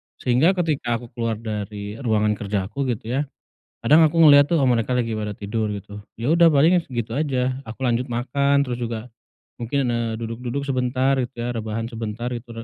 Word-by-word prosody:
Sehingga 140 +10 +2
ketika 150 -9 0
aku 115 0 -8
keluar 115 -2 -2
dari 105 -1 -6
ruangan 105 -4 +1
kerja 100 -1 -2
aku 140 +3 -2
gitu 115 -1 -3
ya. 145 - -2 0.5
Kadang 160 +3 +5
aku 160 +2 +2
ngeliat 145 -1 +7
tuh 165 - +3
mereka 120 0 +1
lagi 115 -3 0
pada 105 -1 -3
tidur 105 +1 -3
gitu. 100 0 -8 0.2
Ya 120 - -2
udah 165 +1 +5
paling 165 +5 +4
gitu 115 -1 -3
aja, 130 -4 0
aku 110 +3 -10
lanjut 120 +1 -1
makan, 140 +4 +1
terus 125 - -2
juga 115 0 -4 0.5
mungkin, 125 +1 -1
eee, 115 -1 -1
duduk-duduk 120 +4 -4
sebentar 130 0 +1
gitu 125 +1 -3
ya, 120 - -2
rebahan 110 -1 -3
sebentar 115 +1 -4
gitu 115 -1 -7
120 Hz, 180 wpm, -22 LUFS, 110-140 Hz, 0.5 s, ngeliat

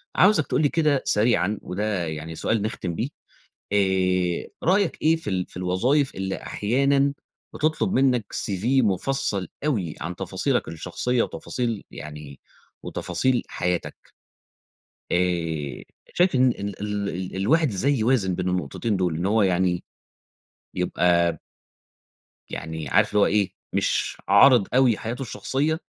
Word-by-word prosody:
عاوزك 185 -6 +4
تقول 130 +3 +1
لي 145 - +3
كده 150 -4 +2
سريعًا 105 -2 +2
وده 95 -3 -2
يعني 80 +1 -6
سؤال 110 +4 0
نختِم 95 -5 -3
بيه. 125 - -2 0.6
آآ 95 -3 +1
رأيك 190 +1 +2
إيه 160 +1 +4
في 135 -10 -5
ال 90 -1 -1
في - - -12
الوظايف 120 +11 +1
اللي 95 0 -3
أحيانًا 140 +5 +1 0.4
بتطلب 155 +5 0
منّك 125 -5 +2
CV 95 -1 -1 0.2
مُفصّل 100 -2 0 0.2
أوي 100 - -1
عن 85 +3 -5
تفاصيلك - - -1
الشخصيّة 90 +9 -1
وتفاصيل، 115 -4 -3
يعني 75 -2 -9 0.4
وتفاصيل 130 -2 0
حياتك؟ 90 -1 -2 1.2
آآ 85 -5 -1 0.3
شايف 180 -3 +3
إن 130 -1 +4
إن 100 -2 -5
ال 100 - -8
ال 105 -1 -2
ال 95 +1 -5
الواحد 150 - +3
ازاي 130 +8 +2
يوازن 110 -6 +2
بين 90 0 -2
النقطتين 95 +4 -1
دول، 90 -4 0
إن 85 - -2
هو 110 +1 +3
يعني 90 -1 +1 0.9
يبقى 85 -2 +1 1.1
يعني 80 0 -5
عارف 105 +2 +3
اللي 105 - +2
هو - - +6
إيه، 100 -2 +1 0.2
مش - - 0
عارِض 115 0 +6
أوي 125 -4 +4
حياته 120 +4 -5
الشخصيّة، 135 +7 -1
100 Hz, 135 wpm, -24 LUFS, 90-130 Hz, 1.2 s, هو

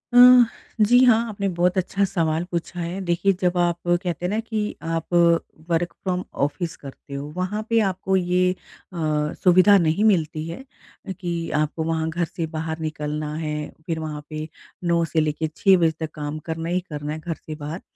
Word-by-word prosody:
अह, 250 0 +9 0.4
जी 245 +3 +5
हाँ 235 -3 +6
आपने 200 -1 -2
बहुत 180 +2 +2
अच्छा 195 +2 0
सवाल 165 -3 0
पूछा 175 +1 -3
है। 170 +3 -3
देखिए 175 +3 +2
जब 180 0 +1
आप 175 -1 +2
कहते 175 0 0
हैं - - +2
ना 215 +2 0
कि 220 -1 -3 0.4
आप 165 +2 -4 0.6
वर्क 170 +1 0
फ्रॉम 185 -1 -1 0.2
ऑफिस 165 +3 -4
करते 140 0 -11
हो 140 +1 -4
वहाँ 195 +4 -1
पे 230 0 +4
आपको 190 +1 -1
ये 180 0 +2 0.4
अ, - - -7 0.5
सुविधा 185 +2 +7
नहीं 165 +4 +2
मिलती 160 -6 +2
है 260 +10 -7 0.5
कि, 170 -3 -4
आपको 155 +1 0
वहाँ 160 0 -1
घर 170 +1 -1
से 165 +1 -4
बाहर 160 0 -4
निकलना 150 -1 -3
है 155 -1 -3 0.3
फिर 165 -1 -2
वहाँ 150 -2 -5
पे 155 0 -5 0.4
9 170 -1 +2
से 160 - +3
लेके 155 +1 -1
6 190 -1 +5
बजे 165 -2 +3
तक 160 -1 -4
काम 150 0 -4
करना 165 +1 -3
ही 180 +1 +1
करना 150 0 -4
है 155 - -5
घर 165 0 -4
से 155 - -8
बाहर। 150 +4 -6
170 Hz, 185 wpm, -23 LUFS, 155-185 Hz, 0.6 s, अह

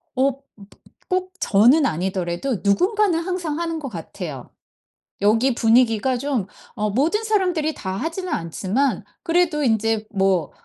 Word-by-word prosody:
어 270 +2 +3
버 270 - -20 0.7
꼭 370 0 -1
저는 245 +9 +4
아니더라도 185 - -2
누군가는 365 - +2
항상 340 -3 -3
하는 330 -1 -2
것 280 -3 -5
같아요. 165 - -7 0.7
여기 225 +6 +3
분위기가 235 +1 +3
좀 250 -6 -2 0.3
어 210 0 -1
모든 310 - +1
사람들이 365 -8 +1
다 190 - -5
하지는 330 - -3
않지만 195 - -1 0.2
그래도 335 -3 +1
인제 225 -2 +1
뭐 190 -6 +1
255 Hz, 275 characters per minute, -22 LUFS, 200-330 Hz, 0.7 s, 저는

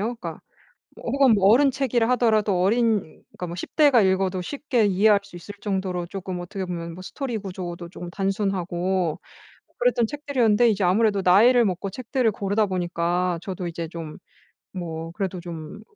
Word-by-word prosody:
그러니까 - - -7 0.6
어 - - -12
혹은 275 -5 +5
어른 230 +9 +5
책이라 250 -3 0
하더라도 215 -6 +2
어린 225 +2 +3 0.4
그러니까 180 - -4
뭐 170 - -6
10대가 280 - +3
읽어도 190 -1 +1
쉽게 260 - 0
이해할 200 +2 +4
수 200 -2 -14
있을 175 +4 -9
정도로 190 -3 -2
조금 185 -1 -5
어떻게 190 +2 -5
보면 170 -2 -5
뭐 185 - -9
스토리 245 +1 -4
구조도 180 -3 -6
쪼금 175 -1 -8
단순하고 190 -3 -1 0.6
그랬던 485 - +2
책들이었는데 245 -5 +2
이제 205 -2 0
아무래도 200 +2 +3
나이를 230 +7 +6
먹고 185 +1 -2
책들을 250 0 0
고르다 205 +2 0
보니까 175 -1 -1
저도 185 -2 -4
이제 170 -1 -5
좀 165 -2 -7 0.6
뭐 165 -3 -5
그래도 185 -1 -3
좀 170 +3 -8
195 Hz, 370 characters per minute, -24 LUFS, 180-225 Hz, 0.6 s, 나이를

